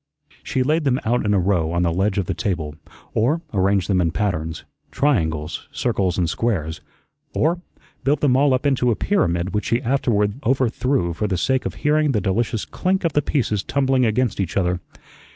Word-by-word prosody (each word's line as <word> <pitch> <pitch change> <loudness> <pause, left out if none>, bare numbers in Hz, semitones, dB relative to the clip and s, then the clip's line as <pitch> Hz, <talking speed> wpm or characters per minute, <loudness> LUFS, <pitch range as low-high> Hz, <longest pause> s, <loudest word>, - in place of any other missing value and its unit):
She 130 - -1
laid 155 +4 +1
them 135 -2 +2
out 120 -1 +1
in 105 - +3
a - - +3
row 90 -3 +1
on 85 +1 +1
the 85 -1 +1
ledge 95 +3 0
of 95 - +1
the 95 - -2
table, 85 -7 -2 0.4
or 140 +10 +1
arranged 95 -1 +2
them 95 -3 +2
in 85 - +2
patterns 80 -4 -2 0.2
triangles, 80 - 0
circles, 100 -7 0
and 90 -2 +1
squares 80 -6 -2 0.5
or 170 +3 +1 0.4
built 140 +1 +1
them 135 -4 +3
all 135 0 +4
up 130 - -3
into 130 -3 +2
a 115 - +2
pyramid 90 - 0
which 105 - -1
she 115 - +1
afterward 115 -4 0
overthrew 130 -5 +1
for 105 +6 -2
the 95 -3 -1
sake 130 +8 +1
of - - -7
hearing 150 -1 +3
the 105 - +2
delicious 105 +3 -1
clink 190 +1 -1
of 165 -3 0
the 150 - +3
pieces 115 -8 0
tumbling 135 +2 +1
against 115 -1 +1
each 95 -1 -2
other. 90 -2 +1
105 Hz, 190 wpm, -22 LUFS, 90-135 Hz, 0.5 s, all